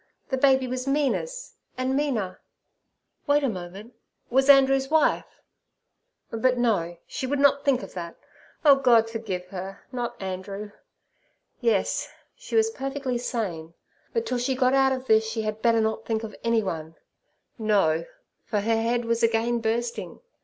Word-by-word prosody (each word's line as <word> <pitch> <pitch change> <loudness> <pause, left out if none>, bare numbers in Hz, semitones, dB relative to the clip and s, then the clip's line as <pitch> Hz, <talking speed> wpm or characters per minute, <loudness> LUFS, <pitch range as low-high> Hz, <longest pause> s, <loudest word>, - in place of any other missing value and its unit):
The 265 - +1
baby 265 -1 +4
was 255 +1 -4
Mina's, 300 - -1 0.2
and 260 +1 0
Mina—wait 285 +3 -3
a - - +3
moment—was 225 +7 -4
Andrew's 270 -1 +6
wife. 315 0 +1 0.9
But 250 +3 +1
no—she 195 -1 -1
would 285 +2 0
not 280 0 +4
think 265 -3 +2
of - - -9
that. 170 -2 -6 0.5
Oh, 280 -2 +8
God 240 -4 +4
forgive 205 -6 -4
her! 190 +1 -7
not 245 -2 -4
Andrew. 195 +2 -5 0.9
Yes, 465 - +1 0.3
she - - -7
was 445 0 +4
perfectly 270 - -3
sane, 175 -10 -4 0.4
but 460 -1 -1
till 250 - -1
she 260 +2 0
got 255 0 +2
out 270 0 +4
of 260 0 -3
this 220 -2 +4
she 225 -1 -3
had 215 0 -3
better 230 -1 +3
not 220 0 -1
think 225 -1 -2
of 215 - -7
anyone. 190 -9 -1 0.6
No, 195 -7 +2 0.4
for 210 - -1
her 225 +1 +1
head 235 +1 0
was 230 0 0
again 230 +1 +2
bursting. 230 +1 -2
235 Hz, 145 wpm, -25 LUFS, 210-270 Hz, 0.9 s, Oh